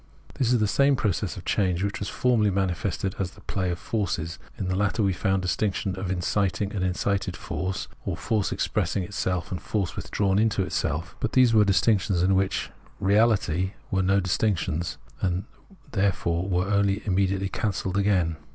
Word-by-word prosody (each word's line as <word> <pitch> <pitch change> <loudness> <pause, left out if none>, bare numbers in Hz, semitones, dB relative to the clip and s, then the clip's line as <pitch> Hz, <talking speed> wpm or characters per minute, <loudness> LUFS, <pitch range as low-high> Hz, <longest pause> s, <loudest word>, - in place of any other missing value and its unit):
This 125 -2 +1
is 125 - +4
the 105 - +2
same 140 +6 +4
process 105 -7 -1
of - - -9
change 95 -2 +1
which 100 +1 -2
was 100 - -3
formerly 120 -5 +2
manifested 95 0 -1
as 95 -2 -1
the - - -17
play 95 -2 -2
of 85 - -1
forces. 85 -5 -2 0.2
In 95 - -3
the 95 - 0
latter 105 +3 +1
we 95 -1 +2
found 95 +1 0
the - - -2
distinction 95 0 0
of 95 0 -4
inciting 95 +1 0
and 95 -3 -1
incited 95 +2 -1
force, 95 +1 -3 0.2
or - - -3
force 110 -3 0
expressing 95 - 0
itself, 90 -3 -2
and 90 -4 -3
force 100 -2 -2
with - - -6
drawn 100 -1 +2
into 110 -2 +2
itself; 85 0 -2
but 125 - -2
these 125 -3 +5
were 110 -1 +6
distinctions 100 -2 +2
which 95 0 +1 0.3
in - - -4
reality 100 -3 +3 0.2
were 95 - +2
no 95 +1 +3
distinctions, 90 -3 0 0.2
and 90 0 0 0.5
therefore 95 -3 0
were 90 0 +1
also 100 0 +2
immediately 95 0 +1
cancelled 95 -1 -2
again. 95 -5 +2
95 Hz, 180 wpm, -26 LUFS, 90-105 Hz, 0.5 s, were